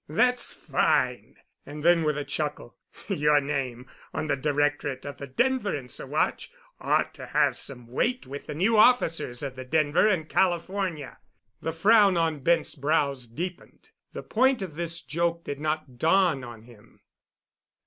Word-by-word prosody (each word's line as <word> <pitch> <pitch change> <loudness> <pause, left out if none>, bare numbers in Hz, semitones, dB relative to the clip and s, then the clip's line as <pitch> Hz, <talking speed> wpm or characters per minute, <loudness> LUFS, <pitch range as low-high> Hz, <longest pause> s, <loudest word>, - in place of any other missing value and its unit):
"That's 250 +10 +2
fine!" - - 0 0.3
And 150 +1 -9
then 170 0 +5
with 150 -2 0
a 145 - -3
chuckle, 145 - -4 0.3
"Your 150 0 +3
name 135 -4 -3 0.3
on 155 - -2
the 155 - +1
directorate 145 -1 -1
of 145 - -7
the 140 - -7
Denver 240 - 0
and 130 -4 -7
Saguache - - -2 0.3
ought - - +1
to - - -10
have - - +2
some 125 -3 -6
weight 235 - -1
with 140 +2 -8
the - - -5
new 205 +8 +2
officers 165 - +3
of 135 -2 -5
the 130 - -7
Denver 155 +7 +2
and 180 -7 +1
California." 175 -5 -1 0.4
The 165 - -2
frown 195 +3 +5
on 160 -3 0
Bent's 165 +4 +1
brows 140 -3 0
deepened. 170 +10 -7 0.2
The - - -7
point 255 -1 +2
of 180 -5 -7
this 170 0 -4
joke 170 +1 -1
did 145 - -5
not 150 -5 -3
dawn 165 -4 +3
on 120 -2 -10
him. 115 -3 -19
155 Hz, 160 wpm, -26 LUFS, 140-175 Hz, 0.4 s, then